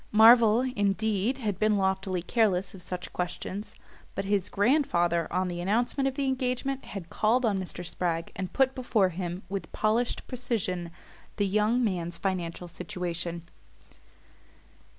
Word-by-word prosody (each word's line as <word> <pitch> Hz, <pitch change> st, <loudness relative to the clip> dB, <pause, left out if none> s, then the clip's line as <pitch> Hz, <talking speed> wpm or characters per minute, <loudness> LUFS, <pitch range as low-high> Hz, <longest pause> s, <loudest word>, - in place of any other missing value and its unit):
Marvell, 225 Hz, +1 st, +7 dB
indeed, 220 Hz, -1 st, 0 dB
had 210 Hz, -7 st, -2 dB
been 215 Hz, -1 st, +3 dB
loftily 190 Hz, -2 st, 0 dB
careless 195 Hz, -4 st, +1 dB
of 190 Hz, -, -11 dB
such 180 Hz, +1 st, -6 dB
questions; 185 Hz, +3 st, -4 dB, 0.4 s
but 195 Hz, -, -2 dB
his 200 Hz, -1 st, 0 dB
grandfather, 195 Hz, -, +2 dB
on 185 Hz, 0 st, +1 dB
the 175 Hz, -1 st, -4 dB
announcement 240 Hz, +8 st, +1 dB
of 265 Hz, -, -2 dB
the 280 Hz, -, -1 dB
engagement, 260 Hz, +1 st, -1 dB
had 185 Hz, -5 st, -8 dB
called 235 Hz, +4 st, +2 dB
on 200 Hz, -3 st, +1 dB
Mr. 180 Hz, -1 st, -6 dB
Spragg 165 Hz, -1 st, -2 dB
and 185 Hz, -1 st, -4 dB
put 265 Hz, -1 st, +3 dB
before 235 Hz, -7 st, +2 dB
him, 180 Hz, +1 st, -4 dB
with 195 Hz, 0 st, -5 dB
polished 225 Hz, +3 st, 0 dB
precision, 210 Hz, -9 st, -2 dB, 0.5 s
the 205 Hz, -, +1 dB
young 215 Hz, +5 st, +2 dB
man's 175 Hz, -5 st, -1 dB
financial 180 Hz, -2 st, -3 dB
situation. 170 Hz, -1 st, -4 dB
195 Hz, 140 wpm, -28 LUFS, 180-235 Hz, 0.5 s, Marvell